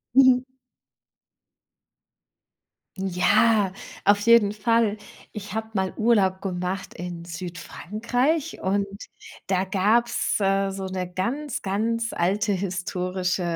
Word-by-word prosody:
Mhm. 260 Hz, -1 st, +6 dB, 2.5 s
Ja, 195 Hz, +2 st, +3 dB, 0.3 s
auf 205 Hz, 0 st, +5 dB
jeden 220 Hz, -1 st, +5 dB
Fall. 220 Hz, 0 st, +1 dB, 0.3 s
Ich 210 Hz, 0 st, -7 dB
habe 220 Hz, 0 st, -2 dB
mal 190 Hz, -2 st, -1 dB
Urlaub 200 Hz, -5 st, +2 dB
gemacht 185 Hz, 0 st, -3 dB
in 175 Hz, -1 st, -7 dB
Südfrankreich 215 Hz, -, -2 dB
und 200 Hz, +1 st, +1 dB, 0.6 s
da 190 Hz, -1 st, +1 dB
gab's, 215 Hz, +7 st, +1 dB
äh, 195 Hz, 0 st, +2 dB
so 195 Hz, 0 st, -5 dB
'ne 185 Hz, -1 st, -4 dB
ganz, 245 Hz, +10 st, -3 dB
ganz 230 Hz, +4 st, -1 dB
alte 200 Hz, +4 st, +1 dB
historische, 185 Hz, 0 st, -2 dB
195 Hz, 95 wpm, -24 LUFS, 185-225 Hz, 2.5 s, Mhm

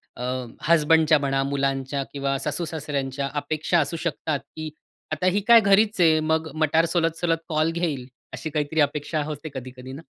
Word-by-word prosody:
अ, -, -, -9 dB, 0.4 s
हसबंडच्या 160 Hz, -1 st, +4 dB
म्हणा, 135 Hz, -1 st, 0 dB
मुलांच्या 135 Hz, 0 st, -1 dB
किंवा 140 Hz, -1 st, -1 dB
सासू-सासऱ्यांच्या 145 Hz, -3 st, -3 dB
अपेक्षा 155 Hz, +4 st, 0 dB
असू 160 Hz, +2 st, -1 dB
शकतात 155 Hz, -3 st, -2 dB, 0.2 s
की 155 Hz, 0 st, -5 dB, 0.4 s
"आता 155 Hz, +3 st, -2 dB
ही 195 Hz, +3 st, +3 dB
काय 235 Hz, -1 st, +9 dB
घरीच 205 Hz, +1 st, +3 dB
आहे. 160 Hz, -2 st, +5 dB
मग 160 Hz, +1 st, 0 dB
मटार 160 Hz, +1 st, +2 dB
सोलत-सोलत 165 Hz, 0 st, +1 dB
कॉल 155 Hz, +1 st, +1 dB
घेईल." 155 Hz, -7 st, -2 dB, 0.3 s
अशी 160 Hz, -, -5 dB
काहीतरी 150 Hz, +1 st, -1 dB
अपेक्षा 145 Hz, +1 st, 0 dB
होते 155 Hz, +1 st, -6 dB
कधी-कधी 130 Hz, 0 st, -8 dB
ना? 145 Hz, -, -8 dB
155 Hz, 155 wpm, -24 LUFS, 140-165 Hz, 0.4 s, काय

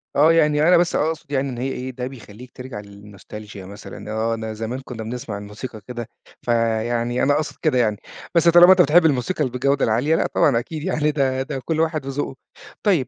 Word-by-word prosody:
آه 155 Hz, +3 st, +5 dB
يعني 150 Hz, -2 st, +3 dB
أنا 180 Hz, -, +6 dB
بس 175 Hz, 0 st, +1 dB
أقصد 160 Hz, -2 st, -2 dB
يعني 135 Hz, -1 st, 0 dB
إن 125 Hz, -, -6 dB
هي 130 Hz, +3 st, -2 dB
إيه، 130 Hz, 0 st, -5 dB
ده 125 Hz, 0 st, -5 dB
بيخلّيك 125 Hz, -1 st, -12 dB
ترجع 125 Hz, -4 st, -8 dB
للنوستالچيا 105 Hz, +1 st, -12 dB
مثلًا، 100 Hz, +2 st, -9 dB
آه 110 Hz, +1 st, 0 dB
أنا 110 Hz, -1 st, -4 dB
زمان 115 Hz, +4 st, -4 dB
كنّا 125 Hz, -4 st, -8 dB
بنسمع 115 Hz, -2 st, -5 dB
الموسيقى 105 Hz, +2 st, -8 dB
كده، 120 Hz, -2 st, -6 dB, 0.3 s
فيعني 115 Hz, +1 st, 0 dB
أنا 145 Hz, -, +3 dB
أقصد 150 Hz, +1 st, -2 dB
كده 155 Hz, -5 st, +2 dB
يعني، 110 Hz, -4 st, +2 dB, 0.4 s
بس 170 Hz, 0 st, +4 dB
طالما 175 Hz, +2 st, +8 dB
أنت 190 Hz, -1 st, +7 dB
بتحب 165 Hz, +2 st, +5 dB
الموسيقى 150 Hz, +3 st, +1 dB
ال 130 Hz, -, -1 dB
بالجودة 135 Hz, +3 st, +1 dB
العالية 125 Hz, +9 st, +2 dB
لأ -, -, +1 dB
طبعًا 125 Hz, -5 st, +4 dB
أكيد 150 Hz, +5 st, -6 dB
يعني 155 Hz, -4 st, 0 dB
ده 135 Hz, -3 st, 0 dB
ده 135 Hz, 0 st, -4 dB
كُلّ 160 Hz, -1 st, -1 dB
واحد 160 Hz, -3 st, 0 dB
وذوقه، 135 Hz, 0 st, -3 dB, 0.5 s
طيّب 175 Hz, -, +2 dB
130 Hz, 200 wpm, -22 LUFS, 115-150 Hz, 0.5 s, طالما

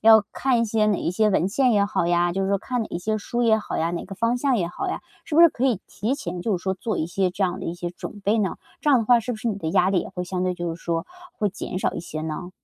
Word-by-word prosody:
要 220 Hz, -1 st, +8 dB
看 255 Hz, -3 st, +1 dB
一 -, -, +3 dB
些 215 Hz, -1 st, +1 dB
哪 205 Hz, -3 st, +2 dB
一 -, -, -1 dB
些 215 Hz, +3 st, +2 dB
文 185 Hz, -1 st, +2 dB
献 250 Hz, +3 st, +3 dB
也 200 Hz, -1 st, +4 dB
好 190 Hz, -4 st, 0 dB
呀， 175 Hz, 0 st, +2 dB
就 195 Hz, +1 st, -1 dB
是 190 Hz, -, 0 dB
说 200 Hz, 0 st, +2 dB
看 245 Hz, +2 st, -2 dB
哪 -, -, -5 dB
一 170 Hz, -, -3 dB
些 215 Hz, +4 st, -1 dB
书 240 Hz, +3 st, -2 dB
也 220 Hz, -2 st, +5 dB
好 -, -, -4 dB
呀， 165 Hz, +1 st, +1 dB
哪 170 Hz, -, -3 dB
个 195 Hz, -, -8 dB
方 230 Hz, +4 st, +1 dB
向 260 Hz, -1 st, +2 dB
也 175 Hz, -, 0 dB
好 385 Hz, -, -4 dB
呀， -, -, -3 dB, 0.2 s
是 300 Hz, -, -5 dB
不 330 Hz, -, +6 dB
是 340 Hz, -, +10 dB
可 255 Hz, -, -3 dB
以 245 Hz, -8 st, +2 dB
提 225 Hz, +6 st, -2 dB
前 175 Hz, -9 st, -5 dB
就 210 Hz, -5 st, +1 dB
是 175 Hz, -, -9 dB
说 190 Hz, 0 st, 0 dB
做 215 Hz, +4 st, -3 dB
一 155 Hz, -, 0 dB
些 185 Hz, +1 st, 0 dB
这 195 Hz, +2 st, 0 dB
样 185 Hz, +1 st, -2 dB
的 -, -, -5 dB
一 170 Hz, -, -3 dB
些 175 Hz, 0 st, -4 dB
准 205 Hz, +3 st, -8 dB
备 205 Hz, +3 st, +2 dB
呢？ 200 Hz, -3 st, 0 dB, 0.2 s
这 300 Hz, -, +2 dB
样 265 Hz, -, +6 dB
的 225 Hz, -, 0 dB
话 240 Hz, +1 st, +5 dB
是 245 Hz, +2 st, -3 dB
不 -, -, -5 dB
是 230 Hz, +2 st, -2 dB
你 205 Hz, -, -1 dB
的 160 Hz, -5 st, -3 dB
压 180 Hz, +3 st, +3 dB
力 190 Hz, -3 st, +2 dB
也 -, -, -6 dB
会 180 Hz, 0 st, -5 dB
相 180 Hz, 0 st, -3 dB
对 185 Hz, 0 st, 0 dB
就 175 Hz, -1 st, -3 dB
是 170 Hz, -, -14 dB
说， 165 Hz, 0 st, -1 dB, 0.3 s
会 210 Hz, -, +2 dB
减 185 Hz, -, -5 dB
少 -, -, 0 dB
一 -, -, -3 dB
些 155 Hz, -2 st, -6 dB
呢？ 160 Hz, +3 st, -5 dB
200 Hz, 355 characters per minute, -24 LUFS, 175-230 Hz, 0.3 s, 是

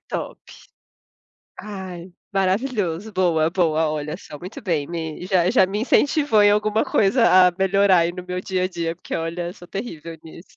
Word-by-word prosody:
Top. -, -, -5 dB, 1.2 s
Ai, 185 Hz, -4 st, -8 dB, 0.2 s
maravilhoso, 195 Hz, -1 st, -1 dB
boa, 165 Hz, -4 st, +2 dB
boa. 160 Hz, -3 st, +1 dB
Olha 150 Hz, 0 st, -4 dB
só, 150 Hz, -, -11 dB
muito 180 Hz, +7 st, -9 dB
bem, 160 Hz, -6 st, -1 dB
me 165 Hz, 0 st, -5 dB
já 185 Hz, -2 st, +2 dB
já 190 Hz, -, +4 dB
me 195 Hz, +2 st, -3 dB
incentivou 280 Hz, -2 st, +3 dB
em 205 Hz, -, +6 dB
alguma 215 Hz, +1 st, +1 dB
coisa 195 Hz, -3 st, +4 dB
a -, -, -3 dB
melhorar 195 Hz, 0 st, +4 dB
aí 170 Hz, +1 st, +1 dB
no 180 Hz, 0 st, -8 dB
meu 180 Hz, 0 st, -4 dB
dia 185 Hz, 0 st, -2 dB
a 185 Hz, -, 0 dB
dia, 165 Hz, -2 st, -3 dB
porque -, -, -7 dB
olha, 170 Hz, +1 st, -3 dB
sou 175 Hz, -2 st, -15 dB
terrível 170 Hz, -6 st, -7 dB
nisso. 165 Hz, +3 st, -14 dB
180 Hz, 170 wpm, -22 LUFS, 170-200 Hz, 1.2 s, em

